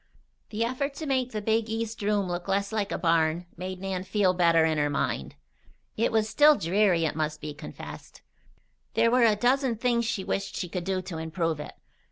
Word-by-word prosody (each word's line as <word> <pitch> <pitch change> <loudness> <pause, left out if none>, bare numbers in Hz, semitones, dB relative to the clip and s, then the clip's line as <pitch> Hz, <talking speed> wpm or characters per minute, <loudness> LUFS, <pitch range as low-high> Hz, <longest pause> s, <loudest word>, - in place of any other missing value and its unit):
The 225 +2 -1
effort 275 +4 -2
to 315 - -5
make 260 -3 0
the 215 -1 -4
big 220 +1 +1
east 225 0 -3
room 205 -1 +1
look 175 +1 -4
less 200 +1 0
like 210 -2 -1
a - - -1
barn 165 0 +1
made 185 +1 -6
Nan 190 -1 -3
feel 190 -1 +2
better 170 -2 +4
in 160 -1 +1
her 145 0 +1
mind. 70 - -2 0.6
It 225 - +1
was 220 -1 +2
still 295 +8 +6
dreary, 180 - +2
it 155 - -1
must 155 -1 -2
be 150 -1 -6
confessed. 150 +1 -10 0.7
There 230 - +4
were 250 -1 +5
a 215 -2 +4
dozen 250 +2 +2
things 235 +1 +1
she 220 -4 -2
wished 195 - -3
she 180 - -3
could 175 -1 -4
do 190 -1 -1
to 170 -3 -6
improve 160 -1 -2
it. 150 - -7
195 Hz, 205 wpm, -27 LUFS, 170-225 Hz, 0.7 s, still